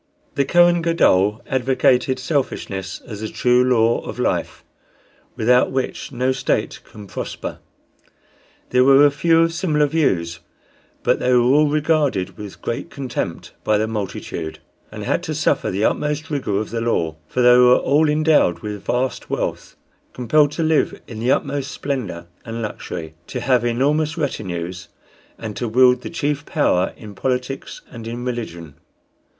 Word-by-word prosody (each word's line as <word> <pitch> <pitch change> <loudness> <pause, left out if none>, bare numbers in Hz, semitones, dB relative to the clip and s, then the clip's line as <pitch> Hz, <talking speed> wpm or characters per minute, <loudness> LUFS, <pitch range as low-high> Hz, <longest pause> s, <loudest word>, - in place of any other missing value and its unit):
The 140 - +1
Kohen 175 +3 +4
Gadol 105 - +2
advocated 130 0 +2
selfishness 100 - -3
as 105 -2 -8
the 110 - -3
true 125 0 +3
law 120 -2 +3
of - - -8
life, - - -2 0.7
without 125 +1 +3
which 130 +1 -3
no 130 0 0
state 130 - -1
can 105 -1 -12
prosper. 95 - -6 1.1
There 125 0 +4
were 135 +2 +7
a 145 - +5
few 165 +3 +3
of 165 0 +2
similar 155 -4 +1
views, 85 - 0 0.6
but - - +2
they 125 - +1
were 125 -1 +5
all 145 +5 +4
regarded 150 - +1
with 105 -3 -10
great 120 +7 -3
contempt 125 - -5
by 110 - +2
the 110 +1 0
multitude, 95 -6 -5 0.3
and - - -7
had - - 0
to - - -4
suffer - - +1
the 100 +4 0
utmost 150 +1 -1
rigor 130 -9 -1
of 105 - -5
the 115 0 -2
law; 80 -9 -1
for 125 - 0
they 125 0 +7
were 125 0 +6
all 150 +2 +2
endowed 150 - +3
with 105 -2 -6
vast 125 +1 -2
wealth, - - -3 0.4
compelled 145 +5 +3
to 165 - -1
live 155 -1 +1
in 110 - -8
the 120 +3 +1
utmost 140 -1 -1
splendor 115 -12 -4 0.2
and 115 0 -5
luxury, 80 -6 -6
to - - -4
have 125 -2 +2
enormous 145 +7 +1
retinues, 90 - -4 0.5
and 110 -2 -6
to 120 - -2
wield 125 +2 +4
the - - -6
chief 150 -3 -2
power 95 - +1
in 105 -2 -10
politics 130 +4 -3
and 115 -2 -8
in 120 +2 -5
religion. 85 - -5
125 Hz, 155 wpm, -20 LUFS, 110-145 Hz, 1.1 s, were